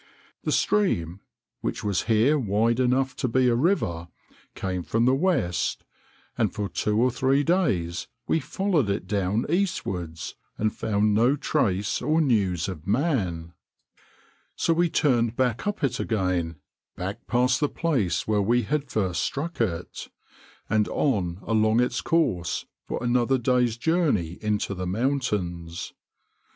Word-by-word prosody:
The -, -, 0 dB
stream, 95 Hz, -, +1 dB, 0.4 s
which -, -, -3 dB
was 100 Hz, -4 st, 0 dB
here 120 Hz, +7 st, +3 dB
wide 115 Hz, +1 st, +1 dB
enough 130 Hz, +1 st, +1 dB
to -, -, 0 dB
be 125 Hz, +2 st, +2 dB
a 120 Hz, -, +4 dB
river, 115 Hz, -, 0 dB, 0.5 s
came 95 Hz, -1 st, -3 dB
from 115 Hz, +7 st, 0 dB
the 130 Hz, -, +4 dB
west, 135 Hz, -, 0 dB, 0.5 s
and -, -, +1 dB
for 105 Hz, -1 st, -3 dB
two 105 Hz, +2 st, 0 dB
or 125 Hz, +2 st, +3 dB
three 135 Hz, +3 st, +2 dB
days 100 Hz, -, 0 dB, 0.2 s
we 160 Hz, -, +2 dB
followed 160 Hz, -, 0 dB
it 100 Hz, -2 st, -1 dB
down 100 Hz, +2 st, 0 dB
eastwards, 95 Hz, -, -2 dB, 0.2 s
and 110 Hz, 0 st, 0 dB
found 105 Hz, 0 st, +1 dB
no 120 Hz, +6 st, +4 dB
trace 100 Hz, -10 st, 0 dB
or 155 Hz, +2 st, +2 dB
news 100 Hz, -, +1 dB
of 90 Hz, -4 st, -7 dB
man; 100 Hz, -, 0 dB, 1.0 s
so 165 Hz, -, +2 dB
we 170 Hz, +1 st, +2 dB
turned 120 Hz, -7 st, +2 dB
back 125 Hz, -, 0 dB
up 205 Hz, -6 st, -2 dB
it 130 Hz, -2 st, 0 dB
again 90 Hz, -6 st, -1 dB, 0.4 s
back 95 Hz, +3 st, -6 dB
past 125 Hz, +1 st, +2 dB
the 145 Hz, -, +1 dB
place 110 Hz, -, 0 dB
where 105 Hz, -1 st, +2 dB
we 120 Hz, +4 st, +2 dB
had 145 Hz, +4 st, -2 dB
first 95 Hz, -7 st, 0 dB
struck 160 Hz, +1 st, -3 dB
it 90 Hz, -6 st, -3 dB, 0.6 s
and 110 Hz, -1 st, +2 dB
on 95 Hz, -, 0 dB
along 110 Hz, 0 st, +2 dB
its 120 Hz, -1 st, +1 dB
course 90 Hz, -, 0 dB, 0.2 s
for -, -, -3 dB
another 120 Hz, +2 st, +2 dB
day's 125 Hz, -2 st, +1 dB
journey 135 Hz, -, 0 dB
into 105 Hz, -2 st, -1 dB
the 90 Hz, -1 st, -4 dB
mountains. 95 Hz, -8 st, -2 dB
115 Hz, 140 wpm, -25 LUFS, 95-135 Hz, 1.0 s, a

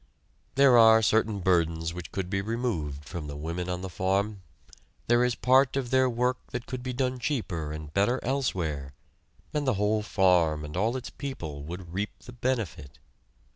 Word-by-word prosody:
There 135 Hz, -3 st, +7 dB
are 110 Hz, 0 st, +7 dB
certain 110 Hz, -1 st, +2 dB
burdens 85 Hz, -2 st, +1 dB
which 90 Hz, -1 st, -8 dB
could 95 Hz, -2 st, -3 dB
be 95 Hz, +1 st, -1 dB
removed 95 Hz, -, -3 dB
from 85 Hz, -1 st, -6 dB
the 70 Hz, -, -6 dB
women 85 Hz, +4 st, -4 dB
on 90 Hz, 0 st, -2 dB
the -, -, -3 dB
farm; 95 Hz, +3 st, -1 dB, 0.6 s
there 120 Hz, +1 st, +4 dB
is 125 Hz, -1 st, +1 dB
part 130 Hz, +1 st, +4 dB
of 125 Hz, -3 st, -2 dB
their 130 Hz, -1 st, +4 dB
work 125 Hz, +1 st, 0 dB
that 125 Hz, -1 st, -5 dB
could 125 Hz, +1 st, -5 dB
be 130 Hz, +1 st, -4 dB
done 125 Hz, 0 st, -1 dB
cheaper 95 Hz, -, -2 dB
and 75 Hz, -1 st, -7 dB
better 105 Hz, +6 st, +2 dB
elsewhere, 85 Hz, -, -2 dB, 0.6 s
and 150 Hz, -2 st, -1 dB
the 130 Hz, -, +3 dB
whole 105 Hz, +2 st, +1 dB
farm 90 Hz, -7 st, +2 dB
and 75 Hz, +1 st, -8 dB
all 110 Hz, +7 st, +1 dB
its 130 Hz, -, -7 dB
people 80 Hz, -, -6 dB
would 85 Hz, +1 st, -8 dB
reap 100 Hz, +3 st, -3 dB
the 125 Hz, -, -13 dB
benefit. 110 Hz, -, -3 dB
100 Hz, 175 wpm, -28 LUFS, 85-125 Hz, 0.6 s, There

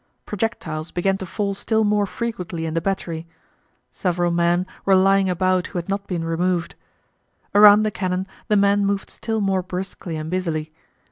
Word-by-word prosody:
Projectiles 170 Hz, -7 st, -3 dB
began 195 Hz, +2 st, 0 dB
to 190 Hz, -, -5 dB
fall 200 Hz, +2 st, -2 dB
still 220 Hz, +3 st, 0 dB
more 205 Hz, -1 st, +2 dB
frequently 180 Hz, -8 st, -4 dB
in 160 Hz, -, -3 dB
the 165 Hz, -, 0 dB
battery. 170 Hz, -3 st, -3 dB, 0.6 s
Several 175 Hz, -1 st, 0 dB
men 175 Hz, +1 st, +2 dB, 0.2 s
were 195 Hz, -, +4 dB
lying 195 Hz, 0 st, +4 dB
about 185 Hz, 0 st, +1 dB
who 185 Hz, -, -6 dB
had 175 Hz, +2 st, -4 dB
not 200 Hz, 0 st, -2 dB
been 175 Hz, -3 st, -2 dB
removed. 175 Hz, +1 st, 0 dB, 0.8 s
Around 205 Hz, +1 st, +8 dB
the 215 Hz, -, 0 dB
cannon 185 Hz, -1 st, -2 dB, 0.2 s
the 210 Hz, -, +2 dB
men 200 Hz, 0 st, +3 dB
moved 200 Hz, 0 st, -1 dB
still 220 Hz, -1 st, -3 dB
more 195 Hz, -2 st, +1 dB
briskly 180 Hz, -2 st, -5 dB
and 155 Hz, +1 st, -5 dB
busily. 160 Hz, -4 st, -2 dB
185 Hz, 165 wpm, -22 LUFS, 170-200 Hz, 0.8 s, Around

